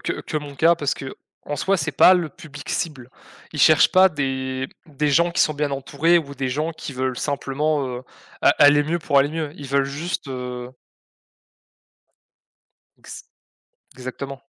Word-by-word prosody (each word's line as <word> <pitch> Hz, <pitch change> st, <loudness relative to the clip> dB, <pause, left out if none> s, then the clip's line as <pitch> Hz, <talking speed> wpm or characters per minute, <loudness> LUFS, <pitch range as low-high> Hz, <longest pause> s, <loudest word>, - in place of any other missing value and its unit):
que -, -, -4 dB
mon 145 Hz, -2 st, -6 dB
cas 165 Hz, +4 st, +5 dB
parce 150 Hz, -3 st, -1 dB
qu'en 140 Hz, +1 st, -9 dB
soi, 195 Hz, +7 st, +1 dB
c’est -, -, -2 dB
pas 185 Hz, -, +7 dB
le 170 Hz, -3 st, 0 dB
public 145 Hz, -1 st, -12 dB
cible. 135 Hz, -9 st, -3 dB, 0.4 s
Ils -, -, -3 dB
cherchent -, -, +6 dB
pas 190 Hz, +1 st, +7 dB
des 130 Hz, -3 st, -3 dB, 0.2 s
des 150 Hz, 0 st, -2 dB
gens 170 Hz, +4 st, +3 dB
qui 170 Hz, -, -1 dB
sont 155 Hz, -, +3 dB
bien 145 Hz, -1 st, -1 dB
entourés 145 Hz, +5 st, +2 dB
ou 140 Hz, -3 st, -6 dB
des 130 Hz, -1 st, -2 dB
gens 155 Hz, +5 st, -2 dB
qui 150 Hz, -3 st, -8 dB
veulent 130 Hz, -1 st, -2 dB
simplement, 145 Hz, 0 st, -1 dB
heu, 125 Hz, 0 st, -6 dB, 0.4 s
a -, -, +5 dB
aller 145 Hz, 0 st, +6 dB
mieux 165 Hz, +4 st, -1 dB
pour 140 Hz, -3 st, +2 dB
aller 140 Hz, +1 st, +3 dB
mieux. 155 Hz, -2 st, -4 dB
Ils 140 Hz, -2 st, -9 dB
veulent 140 Hz, 0 st, +2 dB
juste, 150 Hz, +6 st, -4 dB
heu 125 Hz, -1 st, -6 dB, 2.3 s
Ex -, -, -11 dB, 0.7 s
exactement. 135 Hz, +2 st, -7 dB
145 Hz, 165 wpm, -22 LUFS, 135-155 Hz, 2.3 s, pas